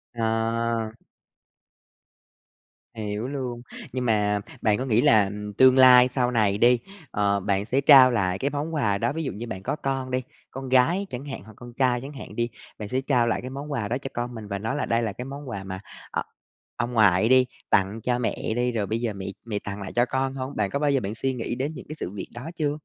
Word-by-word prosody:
À. 115 Hz, 0 st, 0 dB, 2.0 s
Hiểu 105 Hz, +2 st, -3 dB
luôn, 130 Hz, -4 st, -4 dB, 0.3 s
nhưng 125 Hz, -1 st, -2 dB
mà 105 Hz, -2 st, +2 dB, 0.2 s
bạn 105 Hz, -2 st, +3 dB
có 130 Hz, -, -3 dB
nghĩ 115 Hz, -1 st, +3 dB
là, 110 Hz, -3 st, +6 dB
ừm, 105 Hz, +1 st, -6 dB
tương 130 Hz, +4 st, +6 dB
lai 125 Hz, -1 st, +8 dB
sau 125 Hz, -2 st, +1 dB
này 105 Hz, -4 st, +2 dB
đi, 120 Hz, +1 st, +5 dB, 0.3 s
ờ, 100 Hz, -1 st, +1 dB
bạn 100 Hz, +1 st, 0 dB
sẽ 130 Hz, +4 st, +1 dB
trao 135 Hz, -3 st, +8 dB
lại 95 Hz, -5 st, 0 dB
cái 140 Hz, -, 0 dB
món 150 Hz, +3 st, -3 dB
quà 105 Hz, -9 st, +1 dB
đó. 100 Hz, -, 0 dB
Ví 160 Hz, +1 st, -3 dB
dụ -, -, -2 dB
như 115 Hz, +4 st, -7 dB
bạn 95 Hz, -4 st, -6 dB
có -, -, -1 dB
con 135 Hz, -3 st, -3 dB
đi, 130 Hz, 0 st, 0 dB, 0.3 s
con 135 Hz, 0 st, -6 dB
gái 170 Hz, +10 st, +3 dB
chẳng 130 Hz, +1 st, -6 dB
hạn 140 Hz, -, -6 dB
hoặc 110 Hz, -, -13 dB
con 120 Hz, -1 st, -11 dB
trai 125 Hz, -1 st, +1 dB
chẳng 140 Hz, +2 st, -8 dB
hạn 110 Hz, -5 st, -9 dB
đi, 120 Hz, 0 st, 0 dB, 0.3 s
bạn 105 Hz, -, -6 dB
sẽ 130 Hz, +3 st, 0 dB
trao 125 Hz, -4 st, +2 dB
lại 115 Hz, -, 0 dB
cái 125 Hz, -, -6 dB
món 140 Hz, +3 st, -7 dB
quà 115 Hz, -7 st, -1 dB
đó 120 Hz, -, -1 dB
cho 135 Hz, -, -5 dB
con 120 Hz, 0 st, -4 dB
mình 110 Hz, -2 st, -7 dB
và 100 Hz, -1 st, -3 dB
nói 110 Hz, +5 st, -2 dB
là 145 Hz, -, -1 dB
đây 115 Hz, +1 st, +1 dB
là 110 Hz, -3 st, -2 dB
cái 125 Hz, -, -7 dB
món 140 Hz, 0 st, -7 dB
quà 100 Hz, -5 st, -5 dB
mà, 95 Hz, -1 st, -6 dB, 0.3 s
ờ, -, -, -1 dB, 0.5 s
ông 120 Hz, +1 st, -2 dB
ngoại 110 Hz, -1 st, +4 dB
đi, 130 Hz, 0 st, +6 dB, 0.2 s
tặng 100 Hz, +3 st, +2 dB
cho 125 Hz, -1 st, +1 dB
mẹ 115 Hz, -2 st, -2 dB
đi, 125 Hz, +1 st, +1 dB
rồi 110 Hz, -4 st, -1 dB
bây 110 Hz, +4 st, -2 dB
giờ 115 Hz, -3 st, -2 dB
mẹ 95 Hz, -1 st, -7 dB, 0.2 s
mẹ 105 Hz, -3 st, -2 dB
tặng 100 Hz, 0 st, -5 dB
lại 95 Hz, -, -6 dB
cho 120 Hz, -, +4 dB
con 130 Hz, +1 st, -1 dB
hông? 130 Hz, +1 st, -5 dB
Bạn 100 Hz, -2 st, 0 dB
có 140 Hz, -, -2 dB
bao 145 Hz, -1 st, +2 dB
giờ 135 Hz, -, +3 dB
bạn 105 Hz, -1 st, -4 dB
suy 135 Hz, +3 st, -1 dB
nghĩ 120 Hz, -1 st, -3 dB
đến 140 Hz, +5 st, -2 dB
những -, -, -9 dB
cái 155 Hz, -, -5 dB
sự -, -, -3 dB
việc 100 Hz, -1 st, -6 dB
đó 125 Hz, +7 st, -6 dB
chưa? 150 Hz, -3 st, -1 dB
120 Hz, 245 wpm, -25 LUFS, 105-130 Hz, 2.0 s, lai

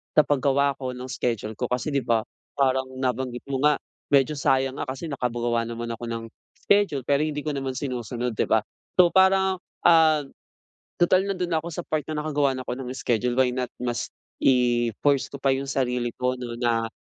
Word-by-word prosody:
sa 155 Hz, -, +8 dB
paggawa 140 Hz, 0 st, +2 dB
ko 130 Hz, -1 st, -4 dB
nung 130 Hz, +1 st, -7 dB
schedule 115 Hz, -3 st, -2 dB
ko. 125 Hz, -, 0 dB
Kasi 125 Hz, +5 st, -2 dB
'di 140 Hz, -, +2 dB
ba, 115 Hz, -2 st, +2 dB, 0.3 s
parang 130 Hz, -1 st, +2 dB
nabanggit 125 Hz, -1 st, -2 dB
mo 135 Hz, -1 st, -1 dB
nga, 150 Hz, 0 st, +5 dB, 0.4 s
medyo 140 Hz, +2 st, +4 dB
sayang 135 Hz, 0 st, +1 dB
nga -, -, -3 dB
kasi 135 Hz, +5 st, -5 dB
nakagawa 120 Hz, -2 st, -1 dB
naman 115 Hz, 0 st, -5 dB
ako 115 Hz, +1 st, -6 dB
ng 115 Hz, 0 st, -4 dB, 0.4 s
schedule, 200 Hz, -10 st, +2 dB
pero 140 Hz, +3 st, +2 dB
hindi 150 Hz, -1 st, -3 dB
ko 155 Hz, -, -2 dB
naman 135 Hz, -2 st, -3 dB
sinusunod, 125 Hz, -2 st, -3 dB
'di -, -, +2 dB
ba? 110 Hz, -, +3 dB, 0.3 s
So, 180 Hz, -2 st, +6 dB
parang, 190 Hz, 0 st, +4 dB, 0.2 s
ah, 160 Hz, -3 st, +5 dB, 0.8 s
total 185 Hz, +2 st, +4 dB
nando'n 180 Hz, -2 st, -2 dB
na 160 Hz, -2 st, 0 dB
ako 170 Hz, -, -6 dB
sa 165 Hz, -, -6 dB
part 155 Hz, -1 st, -1 dB
na 150 Hz, -, -2 dB
nakagawa 145 Hz, -2 st, +1 dB
ako 125 Hz, -1 st, -4 dB
ng 125 Hz, -1 st, -6 dB
schedule, 125 Hz, -1 st, 0 dB
why 130 Hz, -1 st, +4 dB
not 125 Hz, -2 st, -2 dB
mas 120 Hz, -1 st, -3 dB, 0.3 s
i-force 125 Hz, +1 st, +2 dB
ko 140 Hz, -, -7 dB
pa 135 Hz, -1 st, +2 dB
'yong 135 Hz, -, -3 dB
sarili 125 Hz, -2 st, 0 dB
ko 125 Hz, 0 st, +1 dB
'no, 120 Hz, -1 st, -6 dB
na 115 Hz, -2 st, 0 dB
130 Hz, 190 wpm, -25 LUFS, 120-145 Hz, 0.8 s, sa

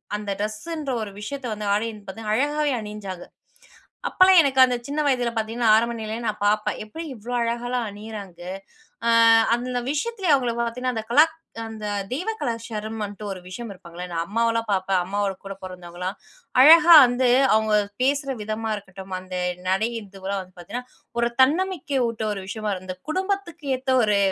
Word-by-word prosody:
அந்த 210 Hz, -1 st, -4 dB
ட்ரெஸ்ஸுன்ற 270 Hz, +8 st, -4 dB
ஒரு 210 Hz, -2 st, -5 dB
விஷயத்த 275 Hz, +4 st, -6 dB
வந்து 210 Hz, 0 st, -5 dB
ஆடையின்னு 215 Hz, -1 st, -2 dB
பாத்தா, 215 Hz, +2 st, -6 dB
அழகாவே 295 Hz, +4 st, +1 dB
அணிஞ்சாங்க. 205 Hz, -4 st, -7 dB, 0.9 s
அப்போலாம் 370 Hz, -1 st, +6 dB
எனக்கு, 270 Hz, -2 st, +1 dB
அந்த 250 Hz, -1 st, -1 dB
சின்ன 290 Hz, +2 st, -2 dB
வயதில 245 Hz, -3 st, +1 dB
பாத்தீங்கன்னா, 225 Hz, +1 st, 0 dB
ஆரம்ப 235 Hz, +2 st, +2 dB
நிலையிலயே 220 Hz, +2 st, -4 dB
நான் 210 Hz, -1 st, -3 dB
பாப்பேன். 210 Hz, +1 st, +1 dB
"எப்டி 270 Hz, +11 st, -8 dB
இவ்ளோ 235 Hz, +2 st, -7 dB
அழகாலாம் 240 Hz, +1 st, -1 dB
அணியிறாங்க?" 205 Hz, -3 st, -9 dB, 0.7 s
அ -, -, +4 dB, 0.5 s
அந்த 250 Hz, +1 st, -3 dB
விஷயத்லே 385 Hz, +5 st, -2 dB
அவங்கள 255 Hz, -4 st, +2 dB
பார்த்தீங்கன்னா, 245 Hz, +1 st, -2 dB
அந்த 220 Hz, -, -2 dB
கலாக் 310 Hz, +5 st, +6 dB, 0.3 s
அந்த 220 Hz, -1 st, -7 dB, 0.3 s
தெய்வ 330 Hz, -, -2 dB
கலாச்சாரமுன்ட்டு 220 Hz, -3 st, -4 dB
ஒரு 190 Hz, -, -6 dB
விஷயம் 220 Hz, +4 st, -7 dB
இருப்பாங்கல்ல. 175 Hz, -1 st, -9 dB
நான் 165 Hz, -1 st, -1 dB
அம்மாவலாம் 230 Hz, +1 st, 0 dB
பாப்பேன். 190 Hz, -1 st, +1 dB
அம்மாவோட 200 Hz, +1 st, -1 dB
கூட 195 Hz, -, -5 dB
பிறந்தவங்கலாம் 180 Hz, +1 st, -6 dB, 0.5 s
அழகா 335 Hz, +4 st, +9 dB
வந்து, 245 Hz, +1 st, +1 dB, 0.2 s
அவங்க 220 Hz, 0 st, +2 dB, 0.3 s
பேசுற 275 Hz, 0 st, +1 dB
விதமா 215 Hz, +1 st, -3 dB
இருக்கட்டும், 195 Hz, -2 st, -8 dB
அந்த 185 Hz, 0 st, -8 dB, 0.3 s
நடைங்கறதுலாம் 200 Hz, -2 st, -2 dB
வந்து 185 Hz, 0 st, -21 dB
பாத்தீங்கன்னா, 245 Hz, +8 st, -6 dB, 0.3 s
ஒரு 235 Hz, 0 st, +2 dB
தன்னம்பிக்கை 300 Hz, -1 st, +2 dB
ஊட்ட 225 Hz, -1 st, -5 dB
ஒரு 195 Hz, -, -5 dB
விஷயமா 215 Hz, +1 st, -3 dB
இருக்கும். 185 Hz, -1 st, -5 dB
அந்த 185 Hz, 0 st, -5 dB
குடும்பத்துக்கு 375 Hz, -3 st, -3 dB
ஏத்த 260 Hz, +1 st, -2 dB
ஒரு 210 Hz, -1 st, +3 dB
225 Hz, 155 wpm, -24 LUFS, 205-260 Hz, 0.9 s, அழகா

